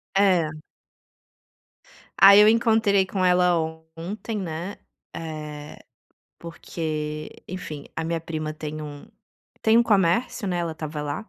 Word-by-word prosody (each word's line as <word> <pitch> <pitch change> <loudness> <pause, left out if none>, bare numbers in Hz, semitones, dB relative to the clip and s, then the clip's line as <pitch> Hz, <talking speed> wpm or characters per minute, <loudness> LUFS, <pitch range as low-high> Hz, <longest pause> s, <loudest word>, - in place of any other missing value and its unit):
É. 180 -6 +3 1.7
Aí 200 +1 +9
eu 210 - +8
encontrei 220 -3 +3
com 190 -1 -2
ela 180 0 +4 0.4
ontem, 210 +6 -5
né, 175 +2 -5 0.4
eh, 150 -2 -7 0.6
porque, 155 -2 -5 0.2
enfim, 155 -5 -7
a 160 - -2
minha 165 0 -2
prima 155 -1 -4
tem 155 0 -6
um 145 -1 -9 0.6
tem 225 +1 +5
um - - +6
comércio, 200 0 +1
né, 180 -2 -1
ela 170 -1 -2
estava 155 -1 -6
lá 150 +9 -5
170 Hz, 120 wpm, -24 LUFS, 155-195 Hz, 1.7 s, Aí